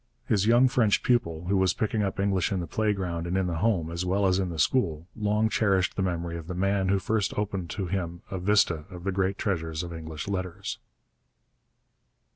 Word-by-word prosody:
His 105 -1 +2
young 120 +3 +6
French 120 -5 +2
pupil, 85 -10 +1
who 100 +3 +1
was 95 -2 +2
picking 110 0 0
up 95 -1 -2
English 100 0 +1
in 95 - 0
the 85 - -3
playground 95 -5 -1
and 90 +2 0
in 95 - +1
the 85 -2 -2
home 85 -4 +1
as 85 +1 -2
well 95 +2 +1
as 95 0 +3
in 95 -2 -1
the 85 - -5
school, 80 - +1
long 105 0 +1
cherished 100 -4 +1
the - - -1
memory 85 -2 -2
of 80 - -11
the 90 - -4
man 95 +1 +1
who 100 - +3
first 100 +1 -1
opened 100 -4 -2
to 95 - -3
him 85 -2 -3
a 95 - -3
vista 90 -5 +2
of 90 -2 -9
the 100 - 0
great 95 +1 0
treasures 80 -6 -2
of 85 -1 -6
English 80 0 -6
letters. 95 -3 -4
95 Hz, 210 wpm, -27 LUFS, 85-100 Hz, -, young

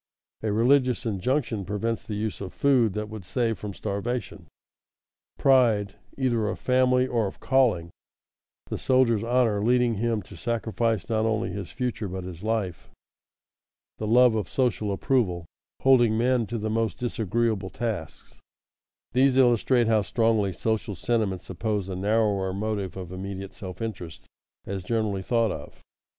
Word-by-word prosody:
A 110 - -1
religious 125 +2 +3
injunction 110 +1 -1
prevents 105 +4 -3
the 105 - -3
use 105 0 -3
of 95 - -7
food 125 -7 +3
that 105 +1 -3
would 110 -2 -8
save 115 +5 -1
from 105 - -5
starvation. 100 -3 -4 0.9
Pride, 115 -7 +3 0.2
either 120 -5 +1
of - - -2
family 125 0 +3
or 115 -5 0
of 95 - -9
calling; 115 -10 +2 0.8
the - - -2
soldier's 125 -4 +3
honor 115 -4 +2
leading 120 0 +3
him 115 0 0
to - - -13
sacrifice 115 -3 -1
not 110 -1 +1
only 110 -4 0
his 100 -1 -5
future 120 -4 -3
but 95 0 -5
his 90 -2 -8
life; 110 -6 -2 1.1
the 110 - -3
love 125 +1 +6
of 105 -6 -2
social 120 -5 0
approval, 95 - 0 0.4
holding 120 -5 +5
men 120 -1 +2
to 120 - -3
the 110 0 -2
most 115 -1 0
disagreeable 115 -3 -1
tasks 105 -10 -5 0.7
these 130 +1 +3
illustrate 120 -1 +4
how 110 -1 +3
strongly 110 0 +1
social 110 0 -2
sentiments 100 -2 -1
oppose 105 +2 -2
the 95 -1 -5
narrower 100 -1 +1
motive 100 -3 -3
of 90 -2 -7
immediate 95 +1 -6
self 95 +1 -7
interest 90 -7 -6 0.4
as 100 -1 -4
generally 105 0 -1
thought 115 +1 +1
of. 75 - -9
110 Hz, 145 wpm, -26 LUFS, 100-120 Hz, 1.1 s, love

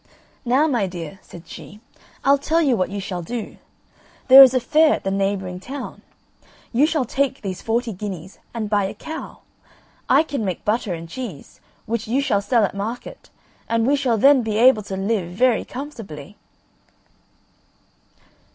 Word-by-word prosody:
"Now, 260 +5 +3
my 240 -10 0
dear," 175 0 -8
said 170 -1 -14
she, 210 - -11 0.4
"I'll 280 +1 +4
tell 320 +4 +1
you 280 -7 +3
what 185 -4 -1
you 200 +1 -5
shall 190 -3 -5
do. 225 +6 -6 0.7
There 265 +1 +11
is 260 -1 +8
a - - +4
fair 305 +5 +3
at - - -9
the 195 - -1
neighbouring 195 -2 -2
town; 270 +8 -8 0.7
you 275 +6 +4
shall 310 -5 0
take 270 +2 -1
these 190 -2 -5
forty 230 0 -1
guineas 190 -2 -7
and 225 -2 -4
buy 205 -1 +1
a 190 - -5
cow. 320 +1 -8 0.7
I 275 +4 +5
can 280 -7 -4
make 185 -4 -4
butter 210 -3 0
and 165 0 -9
cheese, 190 - -8 0.2
which 225 0 -3
you 245 +5 +1
shall 215 -8 +1
sell 225 +2 +2
at - - -5
market, 215 +5 -6 0.4
and 230 0 +1
we 280 +3 +3
shall 260 -5 +1
then 275 +4 +5
be 220 -2 -2
able 240 -1 +5
to 195 -1 -6
live 195 -2 -1
very 245 +3 +2
comfortably." 210 - -9
225 Hz, 170 wpm, -21 LUFS, 195-265 Hz, 0.7 s, There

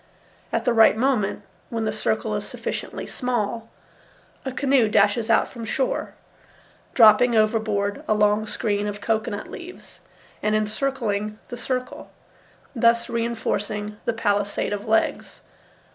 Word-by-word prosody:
At 230 +1 -1
the 245 - +3
right 225 -1 +6
moment 245 -4 0 0.3
when 225 -1 -2
the - - 0
circle - - -1
is - - -2
sufficiently - - -5
small, 230 -3 -2 0.7
a 265 - -3
canoe 265 -4 +2
dashes 210 +3 +2
out 225 - +4
from 235 -3 -9
shore, - - -2 0.8
dropping 235 +1 +6
overboard 215 -2 +1
a 215 - +2
long 210 +1 +2
screen 205 -1 -1
of 205 0 -4
cocoanut 220 -1 -2
leaves 360 +1 -11 0.4
and 215 0 +1
encircling 215 -1 -1
the 245 - -6
circle, 255 +1 -4 0.7
thus 230 0 +3
reinforcing 215 -3 -2
the - - +1
palisade 205 -2 0
of 205 +2 -5
legs. 220 0 0
220 Hz, 130 wpm, -23 LUFS, 210-235 Hz, 0.8 s, right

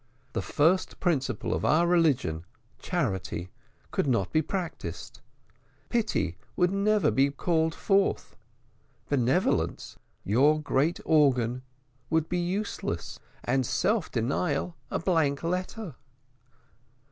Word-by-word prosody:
The - - -1
first 170 +6 +1
principle 135 - 0
of - - -2
our 165 +3 +4
religion, 140 - +2 0.4
charity, 90 -1 -2 0.4
could - - 0
not 115 -8 +1
be 155 - +3
practised 175 +1 -5 0.7
pity 215 - 0 0.2
would 180 0 +2
never 200 -4 +2
be 135 +1 +3
called 160 +2 0
forth 195 -1 +1 0.7
benevolence, 125 - 0 0.2
your 140 +9 +4
great 150 +2 +1
organ, 130 -6 +3 0.5
would 160 -1 +1
be 180 - 0
useless, 190 +5 -3 0.2
and 130 +2 +1
self 205 - 0
denial 140 +7 -1
a - - -1
blank 160 -6 +1
letter. 185 +2 -3
155 Hz, 105 wpm, -28 LUFS, 130-180 Hz, 0.7 s, our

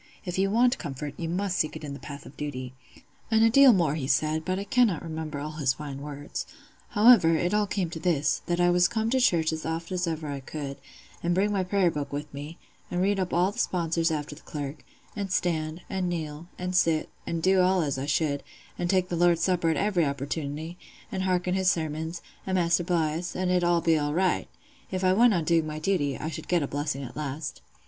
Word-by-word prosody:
If 180 0 -3
you 195 0 +3
want 245 +4 +3
comfort, 140 +1 -5
you 165 -1 -4
must 185 +1 -1
seek 155 - 0
it - - -8
in 145 -2 -5
the 140 - -8
path 140 -1 -9
of - - -12
duty,'—an' 130 - -4
a 225 - +5
deal 275 +1 +8
more 170 -9 +2
he 145 -4 -3
said, 155 +2 +1
but 185 +2 -1
I 200 - -2
cannot 205 -6 +2
remember 160 -2 -5
all 150 +2 -4
his 135 -4 +2
fine 140 -1 -7
words. 145 0 -6 0.4
However, 210 -7 +6
it 175 +4 0
all 210 0 +2
came 185 -5 -2
to 160 - -5
this, 160 -4 +1
that 175 0 0
I 175 0 +4
was 180 0 +4
to - - +3
come 225 -1 -1
to 260 - +3
church 165 -8 +3
as 160 - -4
oft 165 +2 -4
as 180 -1 -1
ever 160 -2 -3
I 140 -1 -3
could, 140 0 -6 0.4
and 175 0 +1
bring 200 +3 +2
my 195 -2 +1
prayer 185 -1 +2
book 145 -2 -4
with 145 +1 -5
me, 145 +4 -7 0.3
an' 175 - -3
read 195 +2 +2
up 185 -1 -1
all 180 +3 +2
the 235 - -8
sponsers 165 -3 +1
after 150 -2 -3
the 145 - -13
clerk, 145 0 -6 0.3
an' 200 -2 -3
stand, 165 -2 -1
an' 185 -2 -2
kneel, 160 -1 -4
an' 180 0 -3
sit, 165 -3 +2 0.2
an' 170 - -1
do 185 +2 +4
all 185 -1 +3
as 140 -3 -2
I 135 - -3
should, 150 -1 +1 0.4
and 175 - -1
take 185 -1 +2
the 175 - -1
Lord's 170 -1 +3
Supper 175 -3 +2
at 160 - +1
every 195 -4 +2
opportunity, 145 +4 -3 0.3
an' 190 - -2
hearken 180 -1 +1
his 190 -1 +3
sermons, 160 0 -2 0.2
and 190 - 0
Maister 170 -1 +2
Bligh's, 165 0 -1
an' 185 0 0
it 180 -1 +2
'ud 175 -1 +2
be 165 -2 +3
all 145 +1 -1
right: 185 0 +1 0.4
if 185 0 -3
I 185 0 +4
went 230 +1 +5
on 170 - +1
doing 165 -1 +2
my 155 0 -5
duty, 155 -5 0
I 155 - -4
should - - -7
get 175 -4 +2
a - - -2
blessing 145 -1 -2
at 125 - -8
last. 150 0 -5
170 Hz, 230 wpm, -27 LUFS, 150-185 Hz, 0.4 s, deal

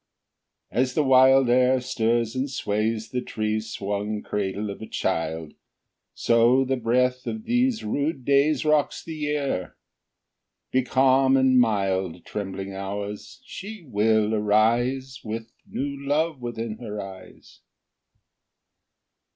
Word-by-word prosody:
3. 120 - +1
As 130 -1 0
the 155 - +3
wild 130 0 +6
air 125 +1 +4
stirs 115 -1 0
and 130 +2 -1
sways 110 -2 -2
The 125 - -1
tree 110 -2 -2
swung 105 -1 -4
cradle 100 0 -3
of 100 - -9
a 110 - -7
child, 80 -1 -2 0.6
So 120 +3 +3
the 135 +1 0
breath 125 +1 0
of 220 0 -4
these 245 +1 +1
rude 140 +4 -2
days 140 +1 +3
_15 155 - 0
Rocks 150 -1 +1
the 165 - -7
Year: 145 - -2 1.0
be 130 - +3
calm 135 +1 +4
and 130 -1 +4
mild, 95 -6 0
Trembling 95 -1 -5
Hours, 100 +2 -6
she 205 -1 -8
will 110 -2 +2
arise 120 +5 +1
With 115 +1 -6 0.2
new 140 0 -4
love 150 0 0
within 115 -2 -4
her 105 -3 -6
eyes. 95 -2 -11
120 Hz, 125 wpm, -25 LUFS, 105-135 Hz, 1.0 s, wild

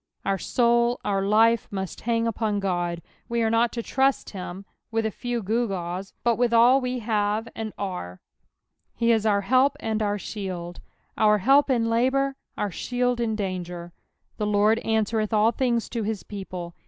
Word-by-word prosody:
Our 195 -1 0
soul, 235 0 +2
our 195 -1 +1
life, 225 +3 +3
must 190 -3 -5
hang 230 0 0
uiwn 220 -2 -1
God; 175 -3 -2 0.3
we 235 0 0
are 220 - +1
nut 230 +1 +3
to 235 - -3
trust 270 +2 +1
him 190 0 -7 0.2
with 225 -1 -1
a 220 - 0
few 240 +1 -3
gewgaws, 195 -4 -2
but 235 -1 +2
with 240 -1 +1
all 245 +4 +6
we 250 0 -2
have 215 0 0
and 220 -1 -5
are. 180 - -5 0.4
" - - -51
He 235 0 +2
it 220 -1 +2
our 200 -1 +3
help 260 +7 +3
and 220 -3 -2
ow 205 -1 +1
ihUld." 185 -4 -5 0.4
Our 210 -1 +5
help 275 +8 +4
in 235 -3 +2
labour, 260 +4 +1 0.2
our 205 - -1
shield 245 +4 -1
in 220 -2 -1
danggr. 180 -3 -4 0.5
The 210 - -1
Lord 210 +2 +3
answereth 220 -1 0
all 215 +1 +4
things 240 -1 0
to 235 - -3
his 215 -1 -3
people. 185 -4 -7
220 Hz, 175 wpm, -25 LUFS, 195-235 Hz, 0.5 s, all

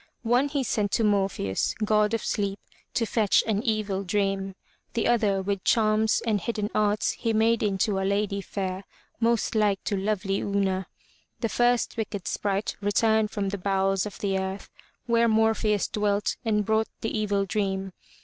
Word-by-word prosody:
One 245 +4 +3
he 285 -1 -1
sent 210 -4 -1
to 230 - +2
Mor'pheus, 195 - 0
god 210 +1 +2
of 225 - -4
sleep, 200 -2 -1 0.4
to 230 - +2
fetch 215 -2 +3
an 215 -2 0
evil 215 -4 -1
dream. 195 0 -1 0.4
The 230 - +1
other 210 -5 +2
with 200 -1 -2
charms 215 -1 +2
and 215 -4 +1
hidden 215 +1 -2
arts 210 0 +1
he 230 -1 -2
made 225 +1 +3
into 195 -1 +1
a - - -1
lady 200 0 0
fair, 190 -1 -4 0.4
most 230 -1 +1
like 210 -3 +1
to 205 - -1
lovely 195 0 -1
Una. 190 -2 0 0.5
The 230 - 0
first 240 0 +1
wicked 210 -4 -4
sprite 200 0 -1
returned 220 +1 +2
from 200 -2 -2
the 200 0 -4
bowels 195 +1 +1
of 205 - -9
the 195 -2 -1
earth 190 +1 -5 0.3
where 235 -1 +3
Morpheus 220 -2 +2
dwelt 205 -1 0
and 210 -3 +1
brought 220 +1 +1
the 225 - -2
evil 205 -2 0
dream. 195 -1 -2
205 Hz, 165 wpm, -26 LUFS, 195-220 Hz, 0.5 s, One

